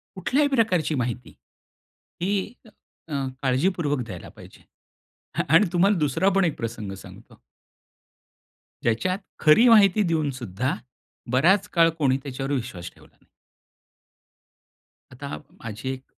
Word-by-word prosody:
कुठल्याही 275 +10 +1
प्रकारची 185 - +1
माहिती, 125 -1 -4 0.9
ही 195 +4 -1
अ, - - -17 0.7
काळजीपूर्वक 145 +2 +1
द्यायला 95 -6 -9
पाहिजे. - - -16 0.7
अ - - +1
आणि 190 - +6
तुम्हाला 195 +3 +3
दुसरापण 185 +6 +2
एक 160 - -1
प्रसंग 115 -3 -5
सांगतो. - - -15 1.4
ज्याच्यात 120 +12 0 0.2
खरी 160 +11 +6
माहिती 210 -2 +6
देऊन 160 -5 0
सुद्धा, 125 0 -3 0.6
बराच 185 +10 +3
काळ 165 -1 +5
कोणी 135 -4 +2
त्याच्यावर 135 0 -5
विश्वास 115 -10 -5
ठेवला - - -21
नाही. - - -30 1.9
आता 75 - -7
माझी 115 +3 -7
1 130 0 -9
150 Hz, 110 wpm, -24 LUFS, 125-190 Hz, 1.9 s, आणि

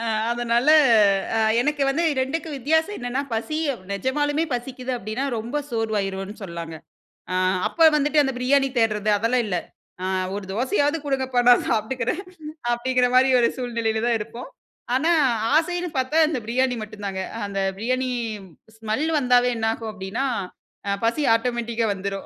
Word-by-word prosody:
அ - - -3 0.3
அதனால 240 +3 +1 0.7
அ, - - +2 0.2
எனக்கு 295 +1 0
வந்து 315 +5 +1 0.2
2க்கும் 300 +3 -3
வித்தியாசம் 320 +9 +1
என்னென்னா 245 +3 -2
பசி 305 +8 -2
அ - - -5 0.2
நிஜமாலுமே 290 +8 0
பசிக்குது 255 +1 -4
அப்படின்னா, 220 +5 -4
ரொம்ப 235 +6 -4
சோர்வாயிருவோம்னு 205 -3 -2
சொல்லாங்க. 170 -2 -7 0.6
ஆ - - -1 0.3
அப்போ 330 -1 +4
வந்துட்டு 295 +1 +3
அந்த 270 -1 -1
பிரியாணி 270 +2 +3
தேடுறது, 215 -2 +1
அதெல்லாம் 235 +2 +1
இல்ல. 180 -3 -1 0.5
"ஆ 185 - -2 0.3
ஒரு 205 -1 -5
தோசையாவது 285 - +1
குடுங்கப்பா 265 -2 -1
நான் 245 - +6
சாப்பட்டுக்குறேன்", 245 - -1 0.5
அப்படிங்கிற 250 +1 +1
மாரி 260 +1 +5
ஒரு 235 - +3
சூழ்நிலையில 230 -3 -2
தான் 235 -1 +2
இருப்போம். 230 +4 -8 0.5
ஆனா, 315 +6 +2 0.4
ஆசைன்னு 350 +2 +1
பார்த்தா, 260 +5 0
இந்த 290 - -2
பிரியாணி 250 +1 +1
மட்டும் 210 -1 -9
தாங்க. 190 -1 -3 0.2
அ - - -5
அந்த 195 -1 -4 0.2
பிரியாணி, 255 +3 -1 0.7
ஸ்மெல் 220 +8 -2
வந்தாவே 250 -1 +3
என்னாகும் 225 0 -2
அப்படின்னா, 205 +7 -3 0.6
அ 200 - 0
பசி 285 +6 +1
ஆட்டோமேட்டிக்கா 235 -1 -1
வந்துரும், 195 0 -5
245 Hz, 145 wpm, -23 LUFS, 220-270 Hz, 0.7 s, நான்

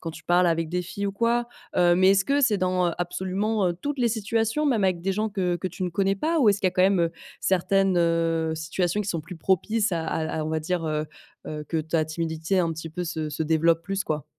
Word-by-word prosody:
quand 165 - -5
tu - - -12
parles 175 +1 +3
avec 165 -1 +1
des 180 +1 -1
filles 200 +3 -4
ou 195 - -2
quoi. 235 +3 +1 0.3
Heu 175 -1 +4
mais 185 +2 +5
est-ce 195 0 +3
que 285 +1 +2
c'est 215 -5 +3
dans, 185 -1 +1
heu, 170 - -2
absolument 190 +3 -1
heu - - 0
toutes 280 +11 -5
les 240 - +3
situations 225 +5 0
même 230 -8 +2
avec 185 -2 +1
des 195 +2 -1
gens 215 +2 -1
que 180 -3 0
que 185 +2 -3
tu 185 +2 -8
ne - - -1
connais 195 +3 0
pas 325 +10 0
ou 235 -8 +5
est-ce 200 0 -1
qu'il - - +2
y - - +5
a - - -3
quand 185 0 +2
même 190 -1 +4
heu, 170 0 +1 0.3
certaines 190 0 +2
heu 165 -1 +1
situations 170 +4 -1
qui 205 - -4
sont 165 -5 -2
plus 165 +3 -9
propices 205 +5 +1
à 165 -1 -1
à 160 -1 -2
on 155 - -3
va 160 0 -1
dire, 170 +1 -2
heu 155 0 -1 0.4
heu, 150 -1 -5
que 165 - -2
ta 160 0 0
timidité 160 +3 -2
un 170 -2 +1
petit 160 +1 -7
peu 180 +2 -4
se 160 -2 -3
se 155 +2 -2
développe 165 +1 +2
plus, 195 +1 -2
quoi? 155 -1 -2
180 Hz, 265 wpm, -25 LUFS, 165-200 Hz, 0.4 s, mais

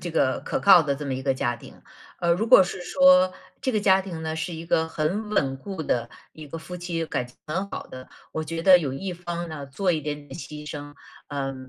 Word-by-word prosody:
这 175 - -5
个 130 -5 +1
可 - - -2
靠 190 -4 +8
的 140 -2 0
这 145 +1 -6
么 135 - -1
一 130 - -4
个 135 -1 +1
家 120 -2 -1
庭。 - - -14 0.4
呃， 170 -1 +2
如 215 +7 0
果 190 - +9
是 180 0 -4
说 275 -5 +5 0.3
这 265 - 0
个 215 - +1
家 190 -1 +5
庭 175 -4 -7
呢， 160 0 -3
是 160 +2 -3
一 160 - -7
个 160 -1 +2
很 175 +8 -2
稳 135 -10 +1
固 190 +2 -6
的 120 -4 -1 0.2
一 155 -1 -10
个 165 +3 -7
夫 180 +2 -8
妻 170 -2 -3
感 125 - -2
情 125 - -20
很 190 +6 -2
好 - - -6
的， 130 0 -10 0.2
我 160 - -2
觉 165 +1 -4
得 185 -1 +8
有 140 -6 -3
一 185 +7 -4
方 175 -1 -5
呢， 145 -3 -7
做 180 +7 0
一 155 - -1
点 145 0 -5
点 - - -9
牺 150 +2 -8
牲， 145 -1 -7 0.3
呃， 135 -2 -3
160 Hz, 260 characters per minute, -25 LUFS, 145-180 Hz, 0.4 s, 果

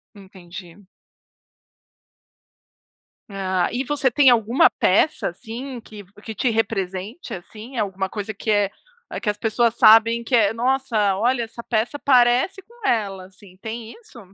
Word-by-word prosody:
Entendi. 190 -1 -13 2.4
Ah, 190 -2 -1
e 250 +2 -2
você 270 -1 0
tem 270 +2 +5
alguma 235 +1 +4
peça, 310 - +1
assim, 240 +8 -8
que 215 -2 -12 0.2
que 220 -2 -7
te 250 - 0
represente, 215 - -3
assim? 215 +7 -10
Alguma 190 -3 -2
coisa 210 +1 -5
que 215 +2 -7
é 205 -2 +2 0.5
que 210 - -1
as 205 - -2
pessoas 230 +1 +1
sabem 230 +1 +5
que 245 +2 0
é: 215 -2 +3
"Nossa, 235 -4 0
olha, 240 +3 +1
essa 230 +1 -9
peça 235 +5 -2
parece 255 - +3
com 465 +2 -9
ela." 195 -5 -1
Assim, 185 0 -18
tem 225 0 -7
isso? 435 - -16
225 Hz, 140 wpm, -22 LUFS, 200-245 Hz, 2.4 s, tem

